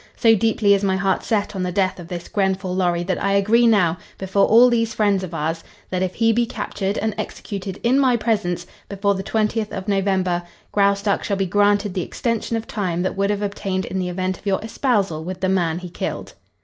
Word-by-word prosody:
So 225 -1 +5
deeply 220 -1 +3
is 200 0 +1
my 190 -1 +2
heart 190 0 +1
set 210 -2 -1
on 190 - -2
the 180 0 -1
death 190 0 0
of 170 - -9
this 175 -1 -6
Grenfall 190 -2 -1
Lorry 175 -2 +1
that 185 +1 -2
I 200 0 +2
agree 220 +4 +4
now, 185 -6 +3 0.2
before 195 +1 +1
all 235 +3 +7
these 230 -2 +1
friends 205 -3 +2
of 180 - -6
ours, 165 +1 -2 0.3
that 185 -1 -1
if 185 -1 -1
he 225 -1 +3
be 235 +1 +1
captured, 205 -3 -3
and 220 0 -1
executed 195 -2 -5
in 250 +4 +3
my 255 -3 +3
presence, 180 -7 -1 0.2
before 200 0 +1
the 190 - -3
twentieth 215 +1 -1
of 190 +1 -6
November, 190 -3 +1 0.3
Graustark 200 0 +2
shall 200 - -1
be 195 - 0
granted 205 +1 +2
the 185 - -1
extension 230 +4 -2
of 225 - -5
time 180 -6 -2
that 185 - -2
would 200 +1 0
have 205 0 -1
obtained 195 -2 -2
in 190 +2 -3
the 180 -1 -2
event 185 +1 -2
of - - -24
your 195 -1 +2
espousal 205 - 0
with 180 +2 -6
the 190 - 0
man 170 -4 +1
he 180 0 -7
killed. - - -5
195 Hz, 220 wpm, -21 LUFS, 185-215 Hz, 0.3 s, all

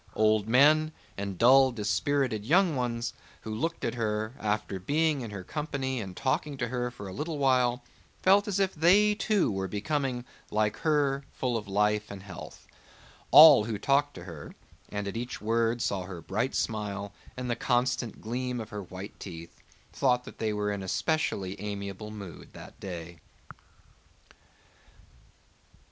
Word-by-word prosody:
Old 110 -1 +3
men 155 +5 +5 0.2
and 100 -2 -4
dull 130 +4 +6
dispirited 120 +1 0
young 170 - +3
ones 120 -2 -2 0.3
who 110 - -5
looked 165 +10 -2
at 115 - -1
her, 110 -1 -2
after 105 -2 -2
being 150 - +1
in 115 - -5
her 100 -2 -7
company 135 - -3
and 95 -3 -8
talking 140 +2 -1
to 120 -2 -2
her 125 0 -1
a 100 -6 -8
little 150 - -3
while, 125 -3 +2 0.4
felt 200 +2 +5
as 200 -1 0
if 190 -1 +1
they 195 +7 +5
too 210 - +1
were 95 -1 -2
becoming, 125 - -2 0.2
like 105 0 0
her, 145 -3 +1
full 125 -2 -2
of 105 -3 -3
life 105 +1 +1
and 100 -1 -8
health. 95 -3 -10 0.6
All 150 -8 +10
who 110 -2 -3
talked 140 +5 +1
to 90 - -9
her, 85 -5 -9 0.3
and 105 -1 -4
at 100 - -4
each 120 +2 -4
word 115 +2 +1
saw 100 -2 -1
her 90 -2 -7
bright 110 +10 -2
smile 100 -2 -2 0.2
and 125 0 -4
the 120 - 0
constant 125 -1 0
gleam 125 +2 -3
of 110 -1 -6
her 105 0 -5
white 95 +2 -9
teeth, 85 -2 -9 0.3
thought 125 -2 +2
that - - -12
they 110 -1 0
were 105 0 -1
in 100 -1 -3
a 95 - -6
specially 100 - -1
amiable 100 0 -5
mood 100 -6 -10
that - - -12
day. 85 -3 -7
115 Hz, 160 wpm, -29 LUFS, 100-135 Hz, 0.6 s, All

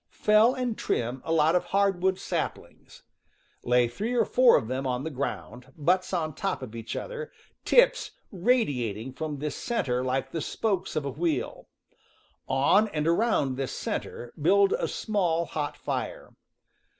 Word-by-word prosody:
Fell 215 +4 +5
and 250 -4 -2
trim 120 +2 -2
a - - -4
lot 160 0 +4
of 180 - +1
hardwood 190 -1 +1
saplings. - - -5 0.6
Lay 125 0 +3
three 215 - -3
or 240 - +3
four 255 -1 +5
of 110 - -3
them 130 +2 -2
on 125 +1 -2
the 160 - -4
ground, 130 -2 -5
butts 180 +5 +1
on 160 -4 -1
top 190 -3 -3
of 120 -4 -8
each 115 0 -6
other, 475 -1 -5 0.3
tips - - +4 0.2
radiating 135 - 0
from 155 0 -4
this 150 +1 -4
center 125 - -1
like 130 +1 -1
the 165 - -3
spokes 190 +2 -2
of 150 - -1
a 140 - -2
wheel. 160 +3 -2 0.8
On 140 +11 +3
and 155 -7 -2
around 170 - +2
this 135 -2 -3
center 120 0 -5
build 200 +5 +4
a - - 0
small, 175 -6 0
hot 150 -3 -4
fire. - - -4
160 Hz, 155 wpm, -27 LUFS, 130-200 Hz, 0.8 s, Fell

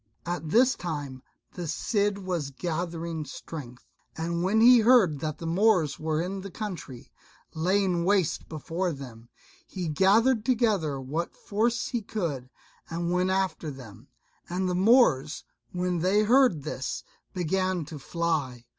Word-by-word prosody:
At 170 -3 -3
this 245 +8 +5
time 145 -6 -5 0.3
the 175 -2 -5
Cid 205 +4 0
was 180 -7 -3
gathering 165 +1 -4
strength; 135 -3 -9 0.3
and 170 +1 -2
when 195 +5 +2
he 245 +2 +8
heard 220 - +5
that 155 0 -3
the 165 - -7
Moors 175 -2 +2
were 155 0 -1
in 190 +2 -4
the 195 - -7
country, 180 - -7 0.4
laying 180 +1 +1
waste 190 -3 +1
before 165 +3 -3
them, 120 -4 -10 0.4
he 180 -3 -4
gathered 210 - +3
together 215 - +1
what 150 +6 -4
force 230 +4 -1
he 240 - -2
could, 165 - -4 0.4
and 170 +1 -2
went 180 +1 +1
after 190 -4 -1
them; 125 -8 -11 0.4
and 185 +2 -1
the 180 - 0
Moors, 180 - +3 0.3
when 180 -1 -1
they 190 +5 +3
heard 230 - +4
this, 135 -3 -4 0.3
began 185 -1 0
to 150 0 -8
fly. 145 -6 -2
175 Hz, 140 wpm, -27 LUFS, 155-200 Hz, 0.4 s, he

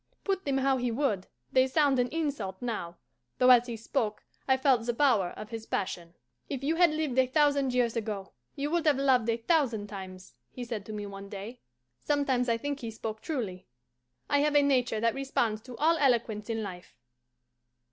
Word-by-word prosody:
Put 390 -1 -1
them 275 -2 +1
how 270 0 +2
he 245 -1 -1
would, 225 -6 -1 0.2
they 260 0 +4
sound 275 -1 +3
an 245 - +2
insult 285 - -3
now, 210 -8 -4 0.4
though 255 0 +6
as 245 0 +6
he 235 -2 -4
spoke 220 -1 -2 0.2
I 265 -1 +4
felt 260 -3 +3
the 240 - 0
power 230 -10 +3
of 215 +1 -8
his 225 -1 -6
passion. 175 -3 -3 0.3
"If 275 -2 -4
you 320 +4 0
had 350 -1 +6
lived 305 -4 -1
a 260 - +4
thousand 285 -1 +2
years 240 -2 +2
ago, 210 -4 -4 0.2
you 285 +2 -2
would 335 -2 +1
have 290 -3 +4
loved 260 -4 +3
a 230 - +2
thousand 235 -5 +1
times," 190 -2 -9 0.2
he 250 - -7
said 225 -4 -5
to - - -6
me 210 -1 -4
one 200 0 -9
day. 210 +5 -8 0.4
Sometimes 265 - +1
I 230 - +2
think 285 +3 -3
he 230 - -5
spoke 220 -1 -6
truly; 220 - -4 0.6
I 285 - +2
have 295 +1 +2
a 290 - +6
nature 250 -5 +2
that 230 0 +2
responds 240 -5 -1
to 245 0 -10
all 330 +2 +3
eloquence 235 -5 +1
in 225 -1 -1
life. 180 -8 -9
245 Hz, 200 wpm, -29 LUFS, 215-280 Hz, 0.6 s, though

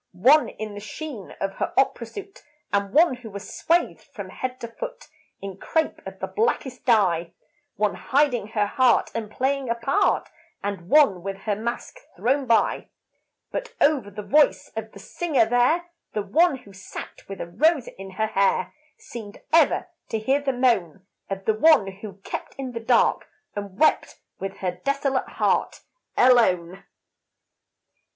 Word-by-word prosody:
One 260 +12 +5
in 215 -1 -7
the 205 - -7
sheen 225 - -8
of 195 0 -2
her - - -2
opera 250 -3 +2
suit; 395 - -10 0.3
And 200 -1 +1
one 305 -4 +4
who 240 -2 -10
was 200 0 -8
swathed 340 +2 +1
from - - -9
head 255 0 -5
to 235 - -4
foot, - - -8 0.4
In 195 -1 -6
crepe 320 +10 -1
of - - -8
the - - -3
blackest 355 - -1
dye. 180 -8 +2 0.4
One 210 -1 +1
hiding 265 -6 +1
her 215 -1 0
heart 250 +4 +3
and 225 -2 -4
playing 265 +3 -1
a 235 - +1
part, 275 - +1 0.4
And 195 -3 -4
one 275 - +5
with 195 +1 -5
her 205 0 -1
mask 235 - -5 0.2
thrown 265 +2 0
by. 230 -1 +2 0.6
But - - -5
over 285 -8 +3
the 205 +1 -7
voice 295 +6 +3
of 220 0 -5
the - - -13
singer 285 - 0
there, 255 +10 +2 0.2
The 210 - -1
one 330 - +3
who 200 -6 -16
sat 190 +1 -10
with 195 - -7
a - - -3
rose 290 - +2
in 195 0 -10
her 220 +3 0
hair, 195 -3 +1 0.2
Seemed 220 -3 -9
ever 325 +2 +4 0.2
to 225 - -1
hear 265 +6 +1
the 280 -1 0
moan 215 -8 +1 0.2
Of 195 0 -5
the 220 - +3
one 260 0 +5
who 205 -1 -8
kept - - -6
in 265 -2 -5
the 235 - -5
dark 230 +1 +2 0.3
and 200 -2 -6
wept 310 - +2 0.2
With 195 0 -5
her 180 -2 -2
desolate 275 -1 0
heart - - 0 0.4
alone. 190 -8 +3
230 Hz, 165 wpm, -24 LUFS, 200-280 Hz, 0.6 s, One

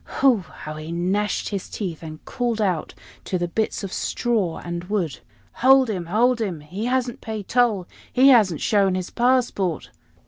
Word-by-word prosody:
Hu! 265 -4 +5
how 155 -4 -9
he 155 +1 -7
gnashed 190 +5 -1
his 200 -3 -4
teeth, 180 -7 -5
and 155 -1 -9
called 240 -3 -2
out 185 -7 -1 0.3
to 185 - -1
the 175 0 -1
bits 215 +4 -2
of 195 - -5
straw 215 -9 -1
and 175 0 -5
wood. 180 -7 -2 0.4
"Hold 260 -1 +6
him! 180 -4 -4
hold 230 +6 +2
him! 180 -8 -3
He 185 +9 -5
hasn't 250 -1 -1
paid 215 -3 -5
toll 225 -7 +2 0.2
he 260 +2 +6
hasn't 205 - +4
shown 195 -3 +2
his 185 -1 -4
passport!" 240 - +1
200 Hz, 170 wpm, -23 LUFS, 175-240 Hz, 0.4 s, Hold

